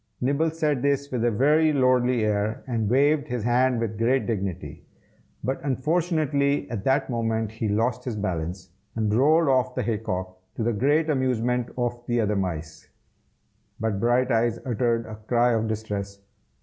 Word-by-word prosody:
Nibble 140 +5 +1
said 155 -4 -1
this 140 0 0
with 125 -3 -1
a 120 - +3
very 150 +8 +3
lordly 125 -4 +2
air, 105 +1 -1
and 115 -5 -1
waved 145 +4 +3
his 125 -5 -3
hand 125 +1 +2
with 110 -2 -3
great 125 +3 +2
dignity; 100 -6 -4 0.6
but 130 +1 -2
unfortunately 145 0 0
at 105 -5 -4
that 135 +1 +2
moment 115 -3 -1
he 110 -1 -3
lost 115 +4 0
his 125 -4 -3
balance, 90 -2 -4 0.2
and 110 -2 0
rolled 155 +7 +4
off 130 -2 +2
the - - -1
hay 110 -3 -1
cock, 95 -3 -4 0.2
to 115 - -2
the 120 +1 +1
great 145 +8 +2
amusement 125 -4 0
of 120 -1 -2
the 120 0 +1
other 105 -2 +1
mice. 85 -5 -4 0.9
But 110 -3 -1
Brighteyes 120 0 +2
uttered 115 -1 0
a 110 -1 -8
cry 120 0 +3
of 110 0 0
distress. 105 -2 -4
120 Hz, 160 wpm, -25 LUFS, 110-135 Hz, 0.9 s, rolled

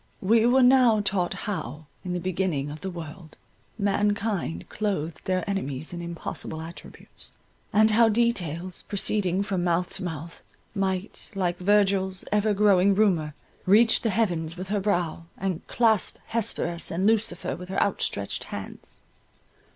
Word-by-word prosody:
We 225 +4 +4
were 260 +1 +5
now 250 -3 +5
taught 190 -3 0
how, 155 - -5 0.2
in 180 -2 -3
the 180 - -1
beginning 175 -5 -2
of 150 - -9
the 190 - -4
world, 165 -1 -9 0.4
mankind 205 - -1
clothed 190 -7 -3
their 185 -1 -1
enemies 160 -7 -3
in 175 - -5
impossible 170 -1 -4
attributes—and 205 +5 -3
how 225 +1 +5
details 185 -7 -1
proceeding 195 -2 +1
from 195 -4 -2
mouth 175 0 0
to 190 - -7
mouth, 165 -1 -6 0.3
might, 195 0 -3
like 180 -2 -1
Virgil's 195 -1 +2
ever 210 +1 +2
growing 200 -1 +4
Rumour, 170 -8 +2 0.3
reach 225 +4 +5
the 230 - 0
heavens 175 -6 -1
with 185 +1 -6
her 205 0 0
brow, 175 -5 -1
and 185 -3 -2
clasp 225 -4 +2
Hesperus 200 -7 0
and 180 +4 -1
Lucifer 220 -4 +1
with 180 +1 -10
her 190 - -1
outstretched - - 0
hands. - - -9
190 Hz, 140 wpm, -26 LUFS, 170-210 Hz, 0.4 s, were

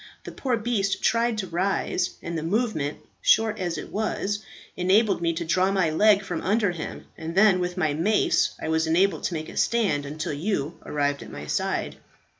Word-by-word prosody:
The - - -7
poor 255 -3 -1
beast 215 -4 -1
tried 230 0 +2
to 195 -3 -3
rise, 180 0 -1
and 170 0 -4
the 160 - -2
movement, 165 - -1 0.2
short 220 -1 +3
as 175 -3 -2
it - - -7
was, 205 -1 -1 0.4
enabled 195 +2 +3
me 170 -1 +2
to 170 +1 -4
draw 185 +3 +2
my 190 -5 +2
leg 205 +4 +4
from 175 -4 -4
under 205 -1 +2
him, 170 -2 -7
and 165 +1 -5
then 195 -2 +5
with 180 +1 -3
my 155 -5 +1
mace 190 +8 +2
I - - -4
was 160 0 +1
enabled 185 +5 +2
to 175 - -1
make 155 0 -4
a - - -10
stand 195 -12 +1
until 150 +1 -4
you 160 -1 -2
arrived 145 -2 -1
at 115 - -9
my 75 - -7
side. - - -2
180 Hz, 195 wpm, -25 LUFS, 160-210 Hz, 0.4 s, then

